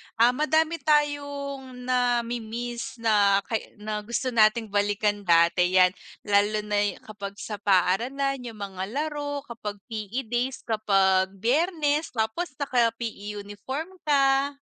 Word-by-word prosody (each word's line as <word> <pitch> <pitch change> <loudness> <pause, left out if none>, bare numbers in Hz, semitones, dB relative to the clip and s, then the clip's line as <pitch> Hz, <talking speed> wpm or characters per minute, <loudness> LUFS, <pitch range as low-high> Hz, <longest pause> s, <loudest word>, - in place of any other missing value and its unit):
ah, 235 +2 +5
madami 315 +4 +1
tayong 285 -3 -1
nami-miss 240 -1 -1
na 200 -2 +4
kay 225 -2 -4
na 210 0 -4
gusto 235 +4 -3
nating 220 -1 +3
balikan 205 0 +1
dati 170 +2 +4
yan. 185 -1 +6 0.3
Lalo 205 +1 +2
na'y 205 -1 0
kapag 200 -2 -8
sa 210 -1 -6
paaralan, 235 +9 +1
yung 230 - -8
mga 190 -2 -5
laro 290 +2 -3
kapag 230 -5 -6 0.2
PE 220 +4 -3
days, 250 +2 -1
kapag 195 -4 +2
Biyernes, 295 - 0
tapos 225 +8 -2
naka-PE 230 -6 -1
uniform 260 - -6 0.2
ka. 275 0 +3
230 Hz, 120 wpm, -26 LUFS, 205-275 Hz, 0.3 s, yan